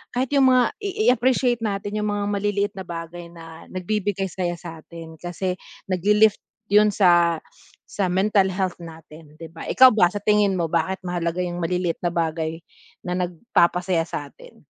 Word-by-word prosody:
kahit 255 +2 +1
yung 270 -1 +5
mga 250 -1 +3
i 405 +2 -1
i-appreciate 245 0 +1
natin 205 -1 -3
yung 210 - -1
mga 205 0 -2
maliliit 205 0 -1
na 190 - -6
bagay 170 0 -7
na 165 -1 -12
nagbibigay 195 +1 -2
saya 175 -1 -2
satin, 165 -1 -10
kasi, 180 +2 -3 0.4
naglilift 210 +3 +3 0.3
yun 210 +1 +4
sa 175 -4 +4 0.5
sa 190 -3 -2
mental 190 +1 +2
health 185 -1 -2
natin, 160 -2 -13
'di 165 - -8
ba? 165 - -9
ikaw 260 0 +8
ba 205 -5 +4
sa 205 - -4
tingin 210 -2 +3
mo 165 - 0
bakit 170 +3 0
mahalaga 175 0 -2
yung 175 0 -4
maliliit 180 0 -1
na 175 - +1
bagay 160 0 -2 0.5
na 180 - -1
nagpapasaya 175 -2 +1
sa'tin? 145 -3 -8
180 Hz, 160 wpm, -23 LUFS, 170-205 Hz, 0.5 s, ikaw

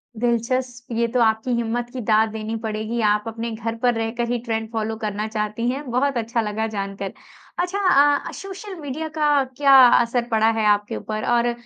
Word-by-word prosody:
दिलचस्प, 245 +1 -1
ये 235 0 +2
तो 250 - +2
आपकी 220 +2 +2
हिम्मत 235 +1 -2
की 255 - -4
दाद 220 0 +3
देनी 220 +1 -4
पड़ेगी 220 +2 -3
आप 210 0 +1
अपने 230 +1 -4
घर 225 +1 -4
पर 245 +1 +2
रहकर 225 +1 -2
ही 245 - +1
ट्रेंड 225 -1 -2
फॉलो 220 -1 -2
करना 215 -1 -3
चाहती 215 +1 -2
हैं, 275 +3 -3
बहुत 265 +2 +1
अच्छा 230 +1 -1
लगा 220 +1 -2
जान 200 -2 -4
कर। 195 - -4 0.5
अच्छा 360 +3 -1 0.5
अ, - - -7
सोशल 390 +1 -8
मीडिया 300 +2 -4
का 295 -2 +3
क्या 280 -1 +5 0.3
असर 240 0 0
पड़ा 220 0 +3
है 220 - +1
आपके 205 0 +2
ऊपर? 215 0 -4
और 240 0 +2
230 Hz, 190 wpm, -22 LUFS, 220-245 Hz, 0.5 s, क्या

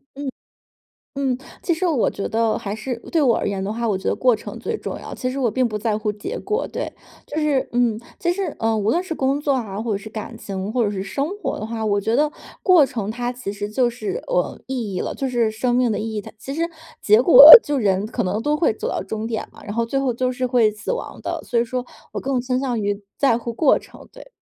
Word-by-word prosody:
嗯。 280 0 -4 0.9
嗯。 270 -2 0 0.2
其 345 - +1
实 350 +3 -2
我 300 -9 +2
觉 200 - -4
得 225 0 +1
还 200 0 -4
是 240 +3 -4 0.2
对 325 - +3
我 245 -5 +4
而 - - -2
言 195 -1 -2
的 200 - -2
话， 230 +1 -2
我 205 -3 +1
觉 190 - -5
得 - - +1
过 250 -2 +3
程 - - -8
最 - - -3
重 - - -6
要， - - -8
其 255 - -3
实 265 +2 -4
我 250 -3 +2
并 255 +2 +1
不 215 -2 -3
在 210 0 -1
乎 215 -1 -1
结 210 0 -6
果。 425 +4 -2
对， - - -4 0.3
就 295 - -6
是 295 -4 +1
嗯， 240 -3 +2 0.2
其 345 - +1
实， 365 -3 -3
嗯， 225 -1 +1
无 205 - +1
论 345 +8 +1
是 370 - -4
工 275 -1 0
作 290 -1 +1
啊， 215 -6 -3
或 230 0 -2
者 200 - +1
是 210 +2 -10
感 215 0 -7
情， 195 +1 -5
或 245 0 +1
者 205 - -1
是 190 -2 -3
生 275 +9 -2
活 - - -3
的 215 - -4
话， 225 0 -4
我 205 -1 +2
觉 220 +3 0
得 300 +2 +2 0.3
过 360 -6 +6
程 230 -6 -4
它 240 +2 -3
其 250 -5 -6
实 205 0 -5
就 240 +3 +2
是， 385 - -4
呃， - - -1
意 240 -7 -3
义 - - -1
了， - - -3
就 270 - -2
是 240 -3 +1
生 240 +3 0
命 250 -2 +2
的 210 - -1
意 220 +1 -4
义 210 - -2
它 - - -11
其 270 +5 -7
实 320 - -3 0.4
结 215 +2 +5
果 355 - +9 0.2
就 290 -1 -1
人 200 -4 +1
可 235 +2 -2
能 205 +3 -1
都 295 +5 +1
会 300 -6 +2
走 - - -5
到 - - -2
终 215 +3 -4
点 225 -2 -3
嘛。 - - -16
然 205 - -6
后 230 +1 0
最 270 +4 -1
后 265 -2 0
就 255 +2 0
是 255 0 -2
会 240 -4 +3
死 210 - -5
亡 - - -6
的， - - -4
所 235 - 0
以 235 - +1
说 250 +1 -3 0.3
我 - - -2
更 265 -1 -1
倾 255 0 -1
向 255 -4 -1
于 205 0 -2 0.2
在 265 -5 +3
乎 235 0 -5
过 275 +5 +4
程， - - -15
对。 - - -14
240 Hz, 285 characters per minute, -21 LUFS, 215-270 Hz, 0.9 s, 果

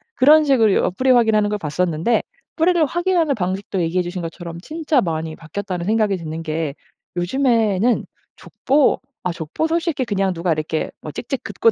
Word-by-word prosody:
그런 300 +4 +6
식으로 235 -8 +3
어 - - +2
뿌리 255 +8 -1
확인하는 220 -4 +4
걸 210 - -1
봤었는데. 165 +6 0 0.3
뿌리를 335 -1 +3
확인하는 345 -1 +1
방식도 190 -1 -2
얘기해주신 175 +2 -1
것처럼 170 0 -7
진짜 305 - 0
많이 160 -3 -3
바뀌었다는 180 +2 -5
생각이 215 -3 +2
드는 165 -1 -6
게 155 -2 -3 0.4
요즘에는 225 +1 +2 0.3
족보 280 +1 +1 0.2
아 180 - 0
족보 160 - -3
솔직히 325 -4 0
그냥 195 -4 0
누가 170 +1 -1
이렇게 155 0 -2
막 150 - -8
찍찍 265 +2 -4
긋고 230 - +2
200 Hz, 380 characters per minute, -20 LUFS, 170-265 Hz, 0.4 s, 그런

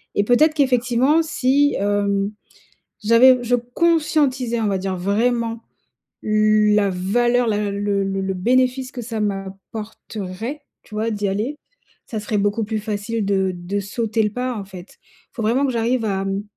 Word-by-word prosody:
et 205 - +3
peut-être 295 +8 +4
qu'effectivement 260 +1 +2
si 285 -2 +2
hem, 200 0 0 0.7
j'avais 245 +4 +6
je 245 +1 +1
conscientisais, 260 -2 +1
on 220 - 0
va 200 -2 +1
dire 190 0 -3
vraiment 230 +4 0 0.6
la 215 -1 +3
valeur, 240 +7 +1
la 210 -2 0
le 200 - -4
le 200 -1 0
le 195 0 -2
le 190 - -1
bénéfice 255 +6 +1
que 245 - -7
ça 225 -1 -4
m'apporterait, 205 +4 -5 0.2
tu - - -14
vois? 220 +2 -1
D'y 205 -1 -1
aller, 220 +10 -2 0.5
ça 220 - -4
serait 210 0 -2
beaucoup 205 +2 0
plus 220 +1 -2
facile 215 +1 -3
de 190 -1 +1
de 175 +3 -3
sauter 220 +2 -1
le 210 - +1
pas, 250 +2 -3
en 205 - -5
fait. 190 -1 -12
Il - - -30
faut 230 - -4
vraiment 245 +6 +2
que 260 - -1
j'arrive 230 0 0
à, 195 -1 -1
mmh, 195 +1 -2
220 Hz, 165 wpm, -21 LUFS, 200-245 Hz, 0.7 s, j'avais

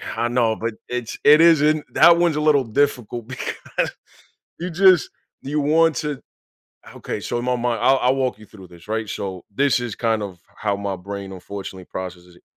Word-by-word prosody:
I 120 - 0
know, 120 -2 +1
but 115 +1 -3 0.2
it's 125 -2 -4
it 150 +2 +7
isn't, 155 -2 +4
that 170 +1 +7
one's 170 -2 +2
a - - 0
little 150 -3 +4
difficult 120 -2 -1
because 125 0 -4 0.7
you 175 - -4
just, 185 0 +5 0.3
you 150 +2 -2
want 160 +2 +3
to 150 -3 -3 0.8
okay, - - -5
so 120 - -3
in 120 - -4
my 125 0 +1
mind, 120 -2 -1
I 130 - +4
I'll 130 0 +2
walk 130 -4 -1
you 110 - -13
through 95 -3 -14
this, 85 +2 -17
right? 110 0 -2
So 95 -2 -5
this 140 +3 +2
is 120 -2 -4
kind 115 -2 0
of 95 -4 -7 0.2
how 105 -2 -1
my 100 -1 -3
brain 100 +1 -7
unfortunately 95 0 -8
processes 90 -1 -8
it. - - -22
120 Hz, 190 wpm, -21 LUFS, 100-145 Hz, 0.8 s, it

